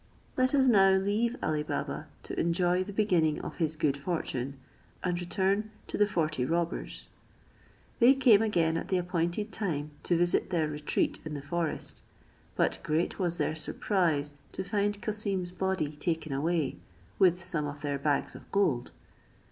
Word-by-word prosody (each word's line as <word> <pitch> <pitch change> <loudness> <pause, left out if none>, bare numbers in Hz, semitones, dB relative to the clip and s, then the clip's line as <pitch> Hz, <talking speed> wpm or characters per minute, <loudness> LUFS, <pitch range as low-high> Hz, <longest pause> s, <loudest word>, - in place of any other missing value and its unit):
Let 255 +2 +2
us 270 -1 +4
now 195 -5 +6
leave 205 +5 +1
Ali 155 -1 +1
Baba 150 - -3 0.2
to - - -5
enjoy 175 +2 +2
the 205 - -7
beginning 180 -7 +2
of - - -7
his 160 -2 0
good 150 -3 +1
fortune, 140 -3 -3 0.5
and 180 -1 0
return 195 +4 0 0.2
to - - -5
the 210 - +4
forty 155 -8 0
robbers. 170 +5 -2 0.9
They 250 +3 +7
came 245 -6 +6
again 170 -7 +2
at - - -4
the 185 - +1
appointed 175 +4 -1
time 150 -8 -2
to 175 - +1
visit 175 +1 +2
their 165 -4 +1
retreat 150 0 -1
in 155 -1 -5
the 145 - -5
forest; 165 +2 -3 0.5
but - - +1
great 160 +6 -1
was 175 -2 0
their - - 0
surprise 155 -2 0 0.2
to 190 - -2
find 205 +1 0
Cassim's 200 -4 -2
body 190 -5 -1
taken 160 -1 -2
away, 150 - 0 0.4
with 180 -1 +4
some 165 -4 -1
of 145 0 -7
their 145 -1 -1
bags 145 0 0
of - - -13
gold. 150 -12 +1
175 Hz, 160 wpm, -30 LUFS, 155-195 Hz, 0.9 s, They